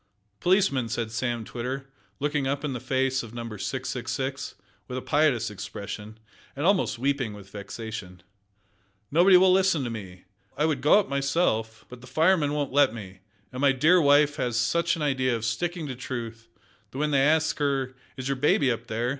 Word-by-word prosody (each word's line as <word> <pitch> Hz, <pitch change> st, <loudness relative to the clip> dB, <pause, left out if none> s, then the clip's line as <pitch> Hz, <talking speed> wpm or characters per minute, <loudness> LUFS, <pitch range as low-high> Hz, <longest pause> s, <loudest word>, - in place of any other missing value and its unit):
"Policeman!" 175 Hz, -, +2 dB
said 115 Hz, -1 st, -3 dB
Sam 120 Hz, -1 st, -2 dB
Twitter, 130 Hz, +4 st, -5 dB, 0.3 s
looking 145 Hz, -1 st, 0 dB
up 140 Hz, +2 st, -2 dB
in 140 Hz, -, -2 dB
the 125 Hz, -, -4 dB
face 130 Hz, +1 st, 0 dB
of 115 Hz, 0 st, -10 dB
Number 115 Hz, -3 st, -6 dB
666, -, -, -4 dB, 0.3 s
with 125 Hz, -, -5 dB
a -, -, -3 dB
piteous 135 Hz, -8 st, +2 dB
expression, 105 Hz, +1 st, -7 dB, 0.4 s
and 145 Hz, +3 st, -2 dB
almost 195 Hz, -8 st, +2 dB
weeping 135 Hz, -3 st, -1 dB
with 100 Hz, -1 st, -13 dB
vexation, 100 Hz, -3 st, -7 dB, 0.9 s
"nobody 180 Hz, +5 st, +6 dB
will 185 Hz, 0 st, +5 dB
listen 185 Hz, -6 st, +3 dB
to 120 Hz, -, -3 dB
me. 95 Hz, -5 st, -8 dB, 0.3 s
I 150 Hz, -, +2 dB
would 150 Hz, -5 st, 0 dB
go 150 Hz, +8 st, +6 dB
up 205 Hz, -, -1 dB
myself, 135 Hz, -6 st, 0 dB
but 125 Hz, -1 st, -12 dB
the 125 Hz, -, -12 dB
firemen 155 Hz, +2 st, +2 dB
won't 145 Hz, -3 st, -2 dB
let 140 Hz, -5 st, +4 dB
me, 95 Hz, -4 st, -9 dB, 0.3 s
and 130 Hz, +1 st, -6 dB
my 140 Hz, -1 st, +5 dB
dear 165 Hz, +7 st, +4 dB
wife 145 Hz, 0 st, +4 dB
has 120 Hz, -2 st, -1 dB
such 165 Hz, +9 st, +1 dB
an 160 Hz, -, -4 dB
idea 130 Hz, -3 st, +1 dB
of 115 Hz, -1 st, -4 dB
sticking 170 Hz, +8 st, -2 dB
to 130 Hz, -3 st, -5 dB
truth 115 Hz, -2 st, -6 dB, 0.4 s
that 130 Hz, -, -10 dB
when 150 Hz, +1 st, 0 dB
they 140 Hz, -2 st, +3 dB
ask 155 Hz, +3 st, +2 dB
her, 135 Hz, -3 st, 0 dB, 0.2 s
`Is 130 Hz, 0 st, -4 dB
your 135 Hz, -1 st, -1 dB
baby 140 Hz, -1 st, +3 dB
up 115 Hz, -, -4 dB
there?' 115 Hz, +3 st, -1 dB
130 Hz, 185 wpm, -26 LUFS, 115-150 Hz, 0.9 s, nobody